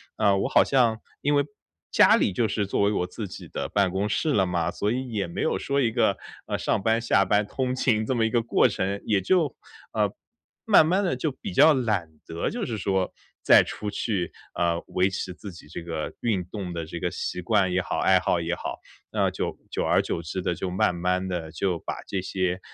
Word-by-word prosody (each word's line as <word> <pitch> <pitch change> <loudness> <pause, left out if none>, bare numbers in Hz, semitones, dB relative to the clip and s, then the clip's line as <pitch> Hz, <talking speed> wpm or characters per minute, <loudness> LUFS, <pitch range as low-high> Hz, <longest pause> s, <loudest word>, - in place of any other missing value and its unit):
呃， 100 -2 +3
我 - - 0
好 - - +5
像 120 -5 +2 0.2
因 145 +1 +1
为 145 - +4 0.5
家 - - +6
里 - - +2
就 110 +5 +1
是 105 -1 -1
作 100 - 0
为 100 - +3
我 90 - 0
自 100 +4 -6
己 90 - -10
的 - - -3
办 100 -3 +1
公 95 +3 -1
室 155 +7 0
了 95 -7 +3
嘛。 85 -1 -1
所 105 - -1
以 130 -1 -4
也 100 -4 -1
没 85 - -5
有 - - 0
说 140 0 0
一 115 - +2
个， 110 -4 +2 0.3
呃， - - -1
上 - - 0
班、 115 +2 +2
下 95 -4 +3
班 105 +1 +2
通 130 +3 -2
勤 110 -4 +1
这 130 - -1
么 115 - +2
一 110 - +1
个 120 0 +2
过 120 +2 +3
程， 100 -1 -2
也 105 -2 +2
就 155 - +1 0.3
呃， - - +1 0.5
慢 155 - +6
慢 185 +5 +2
地 175 -9 0
就 150 +1 -2
比 200 +8 -7
较 160 -3 +6
懒 105 - 0 0.2
得 85 0 -2
就 235 -1 -3
是 115 -4 -3
说 95 -2 -1 0.3
再 - - +7
出 105 - -5
去， 100 -4 -2 0.3
嗯， 85 -1 +1
维 95 +1 +2
持 95 -1 -4
自 100 +2 -9
己 85 -3 -14
这 85 - -7
个 80 -2 -4
运 100 -7 0
动 95 -1 -6
的 85 -1 -4
这 85 +2 -6
个 90 - -1
习 90 - -4
惯 95 +1 +2
也 95 - +2
好、 - - -3
爱 - - +4
好 90 - +1
也 85 +1 -2
好。 - - -6 0.3
那 - - +1
就 - - -3
久 - - -1
而 - - +3
久 85 - -3
之 85 +3 -4
地 90 - 0
就 90 +2 -4
慢 90 0 +1
慢 90 +2 -1
地 85 -4 -4
就 85 +1 -1
把 - - -5
这 95 - -2
些， 90 -1 -1
100 Hz, 250 characters per minute, -26 LUFS, 90-115 Hz, 0.5 s, 再